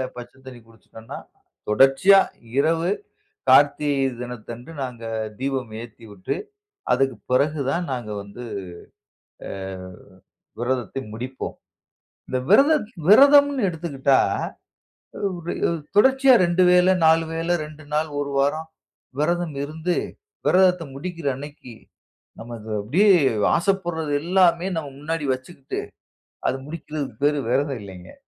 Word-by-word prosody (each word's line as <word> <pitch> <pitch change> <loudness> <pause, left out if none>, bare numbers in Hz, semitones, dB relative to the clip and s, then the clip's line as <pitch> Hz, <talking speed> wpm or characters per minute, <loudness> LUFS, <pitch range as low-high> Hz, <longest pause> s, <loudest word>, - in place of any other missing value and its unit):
பச்ச 120 0 -9
தண்ணீ 125 -2 -10
குடிச்சுட்டோம்ன்னா, 115 0 -12 0.5
தொடர்ச்சியா 135 - +6 0.4
இரவு 165 +4 +2 0.6
கார்த்திகை 145 -1 +4
தினத்தன்று 120 +3 -8
நாங்க 120 -3 -7 0.4
தீபம் 130 -4 -3
ஏற்றிவிட்டு 110 -4 -7 0.6
அதற்கு 135 -2 +1
பிறகு 145 +4 +2
தான் 175 +4 -1
நாங்க 120 -4 -4
வந்து 100 +5 -10 1.0
அ - - -7 1.1
விரதத்த 125 -1 -2 0.2
முடிப்போம். 130 +3 -6 0.7
இந்த 130 - -1
விரதம், 285 +2 +5 0.2
விரதம்னு 280 0 +6
எடுத்துக்கிட்டா 145 -5 +1 1.8
தொடர்ச்சியா 265 +4 +5
2 180 0 +3
வேள, 180 0 +5 0.2
4 160 +1 +5
வேள 165 +1 -3 0.2
2 155 0 -13
நாள் 155 +1 0
ஒரு 140 0 -3
வாரம் 155 +4 0 0.5
விரதம் 170 -1 0
இருந்து 160 +4 -2 0.5
விரதத்த 180 -2 +4
முடிக்கிற 170 0 -5
அன்னைக்கு 145 -3 -10 0.7
நாம் 115 +1 -9 0.3
அப்படியே 165 - +2 0.5
ஆசைப்படுறது 170 -4 -1
எல்லாமே 180 0 +3
நாம் 145 -4 -5
முன்னாடி 160 0 -3
வச்சுக்கிட்டு 130 +1 -7 0.7
அது 130 - 0
முடிக்கரதற்கு 150 -6 -6
பெயர் 145 0 +3
விரதம் 135 -1 0
இல்ல. 95 -3 -11
145 Hz, 100 wpm, -23 LUFS, 130-175 Hz, 1.8 s, தொடர்ச்சியா